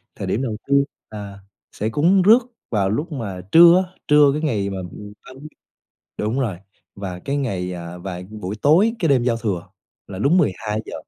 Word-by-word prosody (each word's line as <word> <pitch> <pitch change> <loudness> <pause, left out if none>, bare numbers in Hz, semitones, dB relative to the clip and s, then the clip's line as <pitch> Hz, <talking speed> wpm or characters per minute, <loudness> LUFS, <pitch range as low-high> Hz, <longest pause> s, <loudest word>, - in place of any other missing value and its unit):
thời - - -5
điểm 115 - -1
đầu 115 -5 -3
tiên 140 0 +4 0.3
là 100 -2 -8 0.3
sẽ 110 - -3
cúng 170 - +3
rước 215 +6 +7 0.3
vào 100 -4 0
lúc 150 - -2
mà 100 -10 -5
trưa 170 +2 +8
á, 185 - -28
trưa 150 -1 +6
cái 150 - -2
ngày 110 -11 -1
mà 95 - -5 0.5
30 135 +3 -11 0.7
đúng 110 +5 -1
rồi, 110 -9 -2 0.4
và 95 -3 -6
cái 140 +9 -3
ngày, 95 -9 -2
à 85 0 -8
và 90 0 -6
buổi 105 -2 -6
tối 185 +10 +4
cái 165 -5 +1
đêm 130 -3 +3
giao 120 -2 +1
thừa 100 -7 -3 0.4
là 95 -1 -8
đúng 145 - +3
12:00, 110 - -1
115 Hz, 185 wpm, -21 LUFS, 100-150 Hz, 0.7 s, trưa